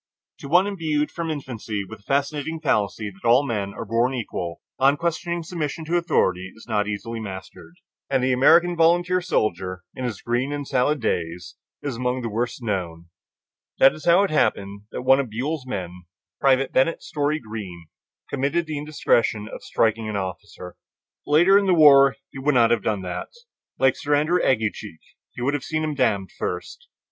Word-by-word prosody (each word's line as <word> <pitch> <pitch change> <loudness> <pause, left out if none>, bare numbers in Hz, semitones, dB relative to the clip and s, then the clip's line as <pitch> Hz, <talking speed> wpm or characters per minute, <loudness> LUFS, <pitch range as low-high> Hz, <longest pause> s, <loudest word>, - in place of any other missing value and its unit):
To - - -8
one 175 +6 +4
imbued 160 -7 -1
from 170 -1 -4
infancy 115 -8 -4
with 110 +1 -10
the 100 - -27
fascinating 145 +3 -1
fallacy 105 -7 0
that 95 0 -21
all 125 +5 +4
men 105 -6 -2
are 115 - -6
born 115 +4 +1
equal, 90 -8 -4 0.2
unquestioning 165 +5 +1
submission 160 -1 -4
to 165 +3 -1
authority 95 - +1
is 110 - -15
not 105 -3 0
easily 115 +2 -4
mastered, 95 - -9 0.3
and 135 -2 +1
the 130 0 +2
American 170 +7 +5
volunteer 175 +2 +3
soldier 95 - -1
in 130 - -6
his 120 -6 -3
"green 120 +4 -1
and 145 -1 -4
salad 135 +2 +1
days" 85 -4 -3 0.3
is 140 -5 -3
among 125 0 -1
the 115 - -3
worst 120 +3 -3
known. 85 -6 -3 0.7
That 135 - +6
is 155 - -11
how 175 +3 +6
it 200 - -1
happened 100 -8 0
that - - -5
one 135 +1 +5
of 135 -4 -2
Buell's 130 +5 -3
men, 90 -6 -6 0.3
Private 135 -1 +3
Bennett 135 +6 +1
Story 150 +1 -1
Greene, 105 - -8 0.4
committed 140 +5 -1
the 155 -2 -4
indiscretion 115 -7 0
of - - -9
striking 110 0 0
his 105 - -4
officer. 95 -1 -6 0.5
Later 175 +7 +6
in 200 - -1
the 185 - +4
war 140 -4 +7 0.2
he 135 - -8
would 145 +1 +1
not 115 -2 +5
have 120 -2 +2
done 105 -3 -1
that; 90 -1 -5 0.5
like 130 -1 +3
Sir 145 -2 0
Andrew 155 +5 +2
Aguecheek, 110 - -1 0.4
he 120 - -5
would 140 +3 +1
have 145 -3 -2
"seen 155 +1 -2
him 155 -1 -1
damned" 110 -9 0
first. 485 0 -5
130 Hz, 180 wpm, -23 LUFS, 105-155 Hz, 0.7 s, war